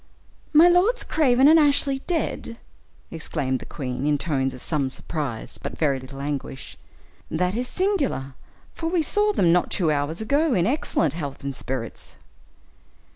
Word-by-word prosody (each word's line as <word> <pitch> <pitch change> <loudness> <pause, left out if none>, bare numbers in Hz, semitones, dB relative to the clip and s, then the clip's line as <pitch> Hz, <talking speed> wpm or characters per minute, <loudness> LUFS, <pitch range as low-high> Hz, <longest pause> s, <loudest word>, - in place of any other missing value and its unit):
"My 315 +3 +7
lords 370 +8 +3
Craven 265 -3 +3
and 320 +2 +7
Ashley 280 -2 +3
dead!" 320 -8 -2 0.5
exclaimed 145 -5 -2
the - - -11
queen, 130 0 -4
in 150 -1 +2
tones 135 -4 -1
of 125 - -6
some 145 -5 0
surprise, 135 -4 -4
but - - -6
very 140 -4 +1
little 135 +1 -10
anguish; 140 -2 -5 0.5
"that 180 +3 0
is 245 +3 -2
singular, 295 - -1 0.4
for 325 - -4
we 340 -2 +1
saw 420 +6 +2
them 180 - +3
not 180 - +2
two 170 -6 +1
hours 150 +3 -1
ago, 280 +6 +1
in 175 -2 +2
excellent 215 - 0
health 145 -4 -6
and 140 -1 -4
spirits." 125 -4 -6
170 Hz, 155 wpm, -24 LUFS, -, 0.5 s, My